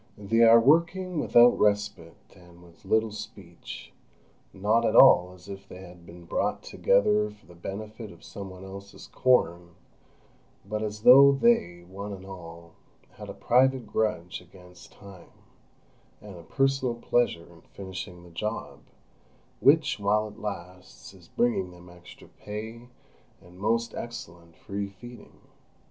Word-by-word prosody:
They 105 +3 0
are 115 0 +8
working 170 +6 +2
without 120 -4 +5
respite 100 -6 -1
and 90 -1 -18
with 85 +2 -20
little 110 +2 +1
speech, 100 -4 -10 0.6
not 105 +4 +1
at 115 -1 +1
all 90 -10 +7
as 90 +1 -18
if 100 0 -9
they 90 - -11
had 90 -1 -15
been 85 0 -13
brought - - -2
together 105 +2 +2
for 105 0 -18
the 90 - -16
benefit 105 +5 -8
of - - -17
some 100 -1 -9
one 95 0 -11
else's 100 +1 -11
corn, 85 -9 +1 0.9
but 105 0 -4
as 105 -1 -5
though 140 +3 +9
they, 135 - +1
one 100 +3 -8
and 95 -1 -10
all, 85 -3 -11 0.4
had - - -11
a - - -8
private 130 0 +2
grudge 105 -5 -2
against 90 0 -17
Time 100 -4 -15 0.9
and 105 -3 -12
a 85 - -11
personal 135 +4 0
pleasure 120 -7 0
in 80 - -18
finishing 90 -2 -9
this 85 -1 -16
job, 105 +6 -5 0.8
which, 150 -2 +3
while 105 +1 +1
it 105 +2 -15
lasts, 90 -3 -8
is 90 -3 -18
bringing 105 -5 0
them 90 0 -15
extra 90 0 -15
pay 110 +3 -9 0.5
and 90 +1 -18
most 115 +3 0
excellent 85 -8 -9
free 100 0 -5
feeding. 115 +4 -14
100 Hz, 145 wpm, -27 LUFS, 90-115 Hz, 0.9 s, though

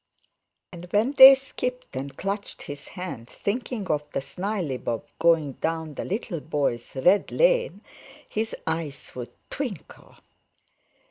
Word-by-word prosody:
And 175 -1 -9
when 210 +8 +2
they 270 -1 +11
skipped 250 - -5
and 135 +1 -5
clutched 200 +1 -4
his 145 0 -8
hand, 150 -10 -6
thinking 235 0 -3
of 150 -1 +1
the - - 0
snileybob 145 - -3 0.2
going 165 -4 +4
down 160 +2 -3
the - - -5
little 195 -3 -3
boy's 140 -6 -2
"red 180 +10 +3
lane," - - +2 0.5
his 220 +1 -2
eyes 160 -4 -3
would 120 -2 -6 0.2
twinkle. 245 - -6
175 Hz, 125 wpm, -26 LUFS, 145-220 Hz, 0.5 s, they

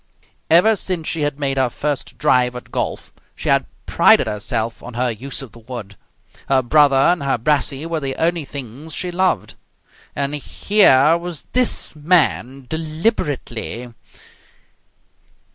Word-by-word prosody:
Ever 180 +7 +5
since 180 -5 -3
she 160 - -2
had 145 -1 -1
made 135 -2 -1
her 130 -2 +2
first 145 +3 -4
drive 125 -1 +2
at 125 - -9
golf, - - -3 0.2
she - - -4
had - - +3 0.2
prided - - +5
herself 110 +2 -3
on 125 -1 -10
her 125 0 0
use 135 +5 -5
of 130 - -11
the 120 - -15
wood. 115 -4 -8 0.5
Her 135 -1 +3
brother 145 +2 +4
and 170 +5 +3
her 135 -2 0
brassey 140 +3 0
were 165 -1 -2
the 135 -2 -3
only 170 0 0
things 140 +2 -8
she 180 -1 -3
loved. 185 +1 0 0.6
And 140 0 -2
here 150 -1 +4
was 175 -3 -7
this 250 -9 +1
man 145 -5 +1
deliberately.... 150 - -3
140 Hz, 145 wpm, -19 LUFS, 125-160 Hz, 0.6 s, Ever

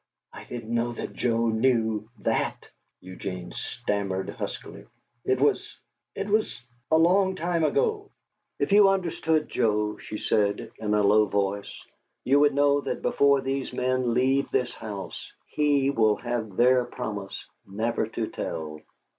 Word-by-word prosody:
"I - - -10
didn't 115 -1 -6
know 120 +1 0
that - - -6
Joe 115 -1 +1
knew 110 -2 +1
that!" - - -1 0.3
Eugene 90 -1 -7
stammered 100 -2 -3
huskily. 100 +1 -7 0.4
"It 130 0 +1
was 145 - +1 0.4
it 200 - -3
was 215 +1 0 0.3
a 160 - +5
long 190 +3 +4
time 170 -1 -1
ago 435 - +1 0.3
" - - -53
"If - - 0
you 200 -1 +7
understood 165 -4 0
Joe," 105 -2 0
she 105 - -7
said, 100 -1 0
in 105 -1 0
a 105 - +3
low 105 +2 +5
voice, 100 0 -2 0.4
"you 140 +2 +4
would 145 -1 +4
know 145 0 +3
that - - -4
before 140 -1 +3
these 135 0 -3
men 125 -1 0
leave 135 +2 +2
this 125 -2 0
house, 105 -4 -7
he 145 -2 +2
will 110 -5 +3
have 120 -5 -4
their 125 +1 +5
promise 105 -6 -6 0.2
never 110 +3 -1
to 115 0 -3
tell." 75 -6 -5
120 Hz, 145 wpm, -26 LUFS, 105-145 Hz, 0.4 s, you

